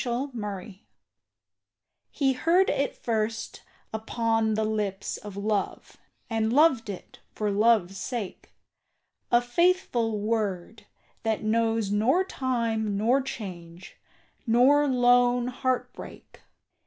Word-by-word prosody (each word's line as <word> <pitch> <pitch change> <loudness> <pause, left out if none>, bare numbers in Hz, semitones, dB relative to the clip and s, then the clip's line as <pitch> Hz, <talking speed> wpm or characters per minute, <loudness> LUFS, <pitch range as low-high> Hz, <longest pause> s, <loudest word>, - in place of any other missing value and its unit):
FOR 255 +3 -2
EVER 205 -3 -6 1.3
He 270 -2 +1
heard 340 +8 +3
it 280 - -1
first 225 -1 -3 0.3
upon 225 0 0
the 220 - 0
lips 210 -2 -2
of 205 -2 -10
love, 205 -1 -2 0.3
And 225 -1 0
loved 265 -5 +4
it 195 - -9 0.2
for 210 -1 -1
love's 205 -3 +2
sake; 225 -4 -5 0.8
A 240 0 +4
faithful 245 - +1
word, 210 -2 -3 0.3
that 220 -1 -1
knows 225 -1 +1
nor 240 - +3
time 230 - -1
nor 240 +6 +2
change, 180 -8 -8 0.5
Nor 270 +6 +5
lone 245 -1 +3
heart 255 0 -2
break. - - -12
225 Hz, 105 wpm, -26 LUFS, 210-250 Hz, 1.3 s, Nor